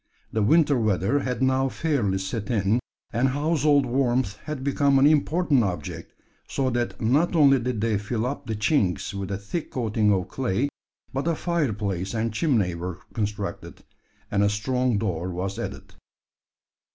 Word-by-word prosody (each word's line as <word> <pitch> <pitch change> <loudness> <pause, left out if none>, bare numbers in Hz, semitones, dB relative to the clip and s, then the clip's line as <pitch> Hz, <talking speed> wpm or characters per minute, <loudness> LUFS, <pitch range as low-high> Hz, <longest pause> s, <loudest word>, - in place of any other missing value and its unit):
The 110 - +1
winter 145 +4 +4
weather 110 +4 +1
had 130 -1 -2
now 130 0 +2
fairly 125 -12 0
set 100 +2 -4
in; 105 0 +2 0.3
and 120 +4 +2
household 145 +1 +2
warmth 120 -4 0
had 150 -4 -4
become 140 0 +3
an 135 - +5
important 150 -2 +3
object: 90 -7 -4 0.4
so 130 -2 -1
that 120 0 -2
not 145 +10 +2
only 140 -4 +6
did 120 -3 -2
they 110 -2 +1
fill 110 +2 -2
up 140 +1 -4
the 110 - -2
chinks 105 - +1
with 100 0 -4
a 100 - -2
thick 100 - -5
coating 110 -3 +1
of 95 -1 +1
clay, 130 +1 -1 0.4
but 135 +4 -2
a 165 - +2
fireplace 105 - -1
and 110 0 -1
chimney 110 - +1
were 85 +1 -5 0.2
constructed, 105 -2 -4 0.5
and 100 - +2
a 100 - +4
strong 125 +3 0
door 90 -4 -2
was 95 +4 -4
added. - - -6
120 Hz, 160 wpm, -25 LUFS, 100-140 Hz, 0.5 s, only